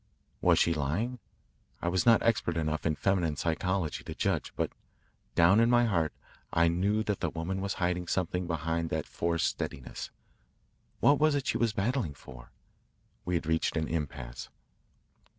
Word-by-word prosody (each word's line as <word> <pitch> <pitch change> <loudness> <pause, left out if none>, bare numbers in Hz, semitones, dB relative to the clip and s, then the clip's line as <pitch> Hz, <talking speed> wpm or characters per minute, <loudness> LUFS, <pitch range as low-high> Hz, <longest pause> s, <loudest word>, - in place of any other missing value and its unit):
Was - - +5
she 85 - +3
lying? 85 - -1 0.6
I - - -3
was 90 +5 +1
not 115 -2 +6
expert 100 -7 +1
enough 75 -1 -1
in 80 - +1
feminine 90 -4 +1
psychology 85 +2 -1
to - - -6
judge, - - -1
but - - -1 0.6
down 85 +5 +6
in 115 +1 +4
my 120 0 +5
heart 85 -8 +1 0.4
I 85 0 +4
knew 100 +6 +1
that 105 -2 -1
the 85 - 0
woman 85 +5 -3
was 100 0 -2
hiding 90 0 -1
something 90 0 -1
behind 80 0 -1
that 80 -1 -2
forced 85 -1 -1
steadiness. 65 - -4 0.9
What 145 0 +5
was 155 -1 +4
it 140 - -1
she - - 0
was 115 -2 +2
battling 110 - -1
for? - - -13 0.8
We 90 - 0
had 85 - -1
reached 80 +1 0
an 80 -1 0
impasse. 70 -6 -4
85 Hz, 165 wpm, -30 LUFS, 80-100 Hz, 0.9 s, not